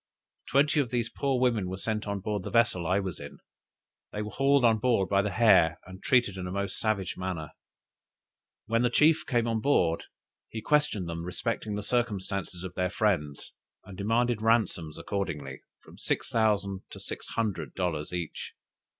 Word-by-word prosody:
Twenty 145 +3 +3
of 135 -5 +1
these 120 -1 -1
poor 135 -3 0
women 115 -7 +1
were 95 - -4
sent 110 +1 -2
on 100 -1 -2
board 105 0 -2
the - - -6
vessel 115 -8 +2
I 95 +3 +2
was 95 -3 -4
in; 70 0 -9 0.7
they 105 - -3
were 105 - -6
hauled 135 -1 +3
on 110 -2 +4
board 115 -5 +2
by 100 -1 +4
the 105 - -1
hair, 95 -6 +4
and 95 0 -11
treated 120 -7 +2
in 90 -1 -4
a - - -5
most 100 0 -3
savage 105 -4 -1
manner. 90 -5 -4 1.1
When 115 +2 +1
the 120 - +3
chief 155 +5 +4
came 120 -3 +1
on 115 -1 0
board, 90 -12 +2 0.4
he 110 - -5
questioned 120 - +1
them 85 0 -4
respecting 105 +4 -3
the 105 - -3
circumstances 100 -6 -2
of 95 - -6
their 90 0 0
friends, 90 -9 -1 0.3
and 95 0 -10
demanded 115 +3 +1
ransoms 110 -9 +1
accordingly, 75 -10 -4 0.2
from - - -15
six - - -2
thousand 100 -4 +1
to - - -10
six - - -8
hundred 110 -4 -2
dollars 85 -5 -2
each. 85 -3 -5
105 Hz, 175 wpm, -28 LUFS, 90-115 Hz, 1.1 s, on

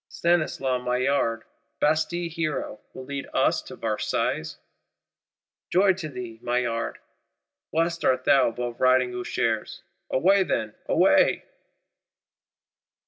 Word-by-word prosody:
Stanislas 135 -7 0
Maillard, 125 -2 0 0.4
Bastille 160 +3 +1
hero, 155 -9 -3
will 130 - -9
lead 140 0 -5
us - - +2
to - - -10
Versailles? 75 0 -2 1.2
Joy 190 +2 +5
to 175 -4 -6
thee, 125 -4 -8
Maillard; 120 -1 -1 0.7
blessed 165 +1 0
art 130 0 +2
thou 135 -2 +5
above 120 +1 -4
Riding 130 -1 +4
Ushers! 115 -2 -2 0.3
Away 195 +8 +4
then, 110 - -1
away! - - +3
130 Hz, 100 wpm, -25 LUFS, 120-160 Hz, 1.2 s, Joy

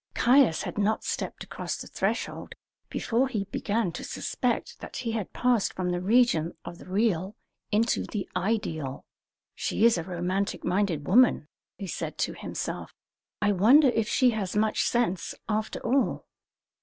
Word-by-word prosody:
Caius 245 - +4
had - - -4
not 210 +2 +1
stepped - - -3
across - - -5
the - - -7
threshold - - -3 0.3
before 240 +4 +1
he 220 -6 -2
began 200 0 -1
to 170 - -7
suspect - - -2
that - - -9
he 245 -3 -2
had 220 -4 -3
passed 245 -4 +1
from 180 -1 -1
the 175 0 -1
region 195 -6 +3
of 175 - -8
the - - -13
real 195 -1 0 0.4
into 220 +3 +2
the 205 -4 -4
ideal. 175 -9 -2 0.5
"She 220 - 0
is 230 -6 +5
a - - -3
romantic 185 +3 -2
minded 180 -5 0
woman," 225 -7 +4 0.3
he 200 - -5
said 185 - -4
to - - -1
himself. - - -5 0.5
"I 205 - +4
wonder 250 +10 +6
if 225 -2 0
she 255 -2 +4
has 210 -4 -3
much 215 +1 +2
sense, 235 -7 0
after 215 0 -1
all?" 260 +3 +1
210 Hz, 155 wpm, -27 LUFS, 180-230 Hz, 0.5 s, wonder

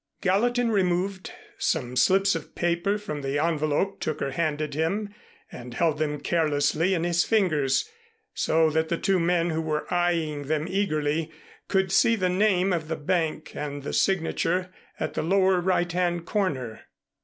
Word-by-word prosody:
Gallatin 235 +5 +2
removed 190 - 0 0.3
some 140 - -1
slips 195 +9 +4
of 165 - -6
paper 175 +4 0
from 155 -9 -6
the 135 +1 -2
envelope 155 +4 0
Tooker 150 -3 -2
handed 155 0 -2
him, 195 +7 -1 0.4
and 120 0 -9
held 160 -3 +1
them 150 -1 -1
carelessly 155 +3 +1
in 165 - -1
his 175 0 +2
fingers, 155 -11 +1 0.5
so 160 0 +2
that 160 +1 0
the 170 - 0
two 190 +1 +1
men, 170 0 +1
who 160 0 -1
were 155 -1 -2
eying 165 -5 0
them 155 0 0
eagerly, 160 -5 -1 0.4
could 190 -2 +1
see 230 +4 +4
the 185 -4 0
name 190 0 +2
of 160 -3 -2
the 160 - -2
bank 155 0 -1
and 145 -1 -5
the - - -5
signature 180 0 0 0.3
at - - -3
the - - -1
lower 190 +1 +3
right 175 -1 +1
hand 175 -1 -1
corner. 140 - -2
170 Hz, 155 wpm, -26 LUFS, 155-190 Hz, 0.5 s, slips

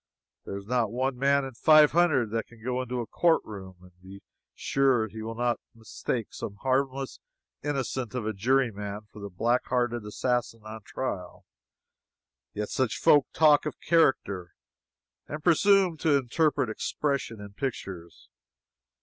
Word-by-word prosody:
There 100 - -5
is 100 - -9
not 115 -2 0
one 130 +2 -1
man 140 +2 +2
in 135 - -7
five 155 +4 +6
hundred 145 -9 +2
that 115 0 -2
can 115 -2 -18
go 125 +1 -1
into 125 -1 -3
a - - -4
court 170 +7 +2
room 95 -3 -9
and 90 - -16
be 95 +1 -12 0.3
sure 135 -4 +2
that 105 - -11
he 110 - -7
will 115 +1 -5
not 120 0 0 0.2
mistake 115 0 -4
some 100 - -6
harmless 135 0 -1 0.4
innocent 130 -4 -3
of 120 -4 -2
a 110 - -1
juryman 105 -2 0
for 105 - -11
the 100 - -6
black 120 +7 0
hearted 120 -2 0
assassin 115 +2 -2
on 110 +1 -8
trial. 95 -6 -5 1.1
Yet 105 0 -4
such 130 -4 -1
people 145 -2 +6
talk 150 -1 +4
of - - -6
"character" 100 - +1 0.7
and 150 +1 -6
presume 185 0 +4
to 150 -2 +3
interpret 140 +1 +1
"expression" 140 -1 -2
in 100 -1 -10
pictures. 95 -9 -6
125 Hz, 155 wpm, -27 LUFS, 110-140 Hz, 1.1 s, five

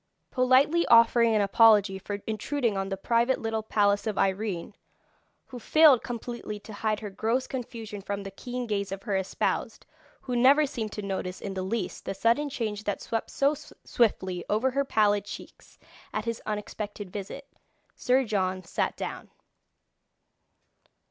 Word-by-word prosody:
Politely 260 +6 +4
offering 230 0 +5
an 210 - +3
apology 205 -1 +5
for 200 +1 -6
intruding 225 +1 -1
on 195 0 -2
the 195 - -3
private 235 +5 +1
little 225 -1 -2
palace 205 -1 +1
of 215 - -2
Irene, 195 -1 -1 0.7
who 250 - -9
failed 300 -1 +6
completely 235 -3 -6
to 215 - -11
hide 215 +1 -1
her 210 -2 -6
gross 225 +6 0
confusion 225 -5 -6
from 200 0 -4
the 195 - -7
keen 245 +5 -5
gaze 200 -3 -2
of 195 0 -6
her 205 -4 -1
espoused, 190 0 -2 0.4
who 250 -2 -4
never 275 +5 +5
seemed 225 -6 -4
to 210 - -5
notice 190 -2 -4
in 195 - -5
the 190 - -3
least 190 +1 -3
the - - -3
sudden 230 +9 +2
change 215 -6 -3
that 205 - -1
swept 225 -1 -3
so 280 +2 +2
swiftly 190 -10 -1
over 220 +6 +1
her 280 +2 +1
pallid 205 -5 +2
cheeks - - -11 0.3
at 215 0 -3
his 230 -1 -3
unexpected 210 -2 -5
visit, 210 +8 -7 0.5
Sir 255 +2 +2
John 185 -4 -1
sat - - -2
down. - - -6
215 Hz, 155 wpm, -27 LUFS, 200-245 Hz, 0.7 s, failed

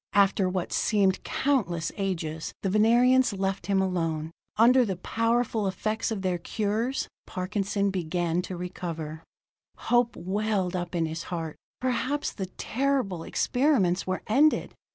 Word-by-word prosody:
After 195 -1 +4
what 185 -1 -2
seemed 200 -3 +2
countless 200 - 0
ages, 165 -6 -3
the 195 - 0
Venerians 240 +3 +4
left 195 -2 -2
him 195 -1 +3
alone. 165 -4 -1 0.3
Under 250 +3 +6
the 195 -5 -1
powerful 230 +2 0
effects 215 +3 -1
of 210 -4 -3
their 180 -2 0
cures, 220 +8 -1 0.2
Parkinson 200 +1 -1
began 175 -1 -1
to 180 0 -6
recover. 165 -3 -5 0.6
Hope 240 0 +2
welled 195 -1 -1
up 175 0 -3
in 165 -1 +1
his 160 +1 -5
heart; 165 -3 -4 0.2
perhaps 255 +3 -1
the 190 -3 -4
terrible 240 -3 -1
experiments 215 - +1
were 185 0 -2
ended. 285 +8 +3
195 Hz, 130 wpm, -27 LUFS, 175-230 Hz, 0.6 s, Under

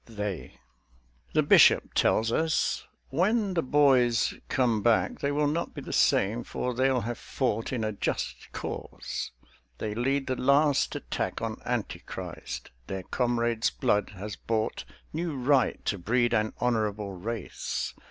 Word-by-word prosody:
"THEY" 105 -5 -5 0.8
The - - +4
Bishop - - +6
tells 110 +1 +3
us: 160 +4 +1 0.2
"When 195 - +1
the 170 - +2
boys 130 -5 +4 0.2
come 120 -5 +2
back 120 - +2
They 140 - 0
will 150 +1 +1
not 155 +4 -1
be - - -5
the - - -6
same; 110 +5 +3
for 125 +2 -3
they'll 130 0 +2
have 120 +1 -4
fought 115 -4 -1
in 125 -4 -1
a 110 - 0
just 100 - -3
cause: - - -5 0.5
they 105 -1 -3
lead 135 +4 0
the 130 - -1
last 140 +3 +3
attack - - -3
On - - -4
Anti - - -2
Christ; 60 0 -7 0.2
their 95 -1 -4
comrade's 120 0 +1
blood 105 0 0
has 100 +1 -5
bought 110 - -2 0.3
New 165 -1 -2
right 130 0 +2
to 100 - -1
breed 120 +6 +1
an 110 -1 +1
honourable 105 -4 0
race. 105 +3 -4
120 Hz, 145 wpm, -28 LUFS, 110-140 Hz, 0.8 s, Bishop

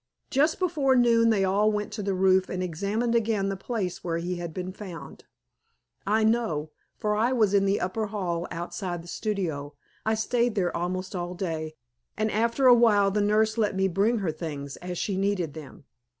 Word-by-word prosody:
Just 300 +4 +3
before 310 -8 +2
noon 230 -2 +4
they 205 -3 +3
all 205 +3 +3
went 210 0 -3
to 215 - -4
the 195 -1 -1
roof 185 0 +3
and 185 0 -2
examined 200 +7 -1
again 215 -4 +1
the 195 - -2
place 195 -2 -4
where 165 -2 -1
he 175 +1 -3
had 170 -1 -5
been 185 +2 -5
found. 175 -8 -9 0.8
I 215 +2 +3
know, 215 -10 0 0.3
for 210 -2 0
I 230 +4 +2
was 215 -5 +2
in 200 -1 +4
the 195 +1 +2
upper 210 +4 -2
hall 180 -5 -3
outside 175 0 -5
the - - -14
studio. 165 -9 -3 0.3
I 220 0 +1
stayed 235 +1 0
there 180 -4 0
almost 185 +2 -3
all 175 0 -4
day, 160 -4 -4 0.4
and 215 0 0
after 230 +5 +1
a 250 - +9
while 210 -4 +4
the 210 +1 +1
nurse 215 +2 +2
let 210 -3 +1
me 190 0 +2
bring 200 +6 +1
her 160 - +1
things 145 -3 -6
as 180 0 -6
she 195 +1 -1
needed 190 -6 0
them. 150 -3 -11
195 Hz, 195 wpm, -27 LUFS, 175-220 Hz, 0.8 s, a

